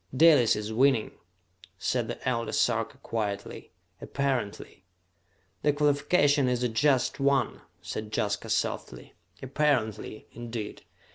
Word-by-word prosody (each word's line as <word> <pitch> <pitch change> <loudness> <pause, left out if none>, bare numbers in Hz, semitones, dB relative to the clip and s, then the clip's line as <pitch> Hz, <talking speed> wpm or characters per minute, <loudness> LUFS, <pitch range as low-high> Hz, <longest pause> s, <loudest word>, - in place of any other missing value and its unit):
"Dalis 150 -7 +6
is 105 +1 -4
winning," 130 -1 +3 0.7
said - - -1
the - - -6
Elder 115 -2 -1
Sarka 115 +3 +1
quietly, 100 -5 -4 0.3
"apparently!" 130 -9 -3 0.8
"The 150 - +2
qualification 145 -1 +3
is 125 -1 0
a 125 - +1
just 130 +4 +2
one," 140 0 +1 0.2
said 110 0 -5
Jaska 100 -1 -1
softly. - - -2 0.3
"'Apparently,' 130 -6 -1
indeed! 115 -2 -7
125 Hz, 110 wpm, -28 LUFS, 110-140 Hz, 0.8 s, Dalis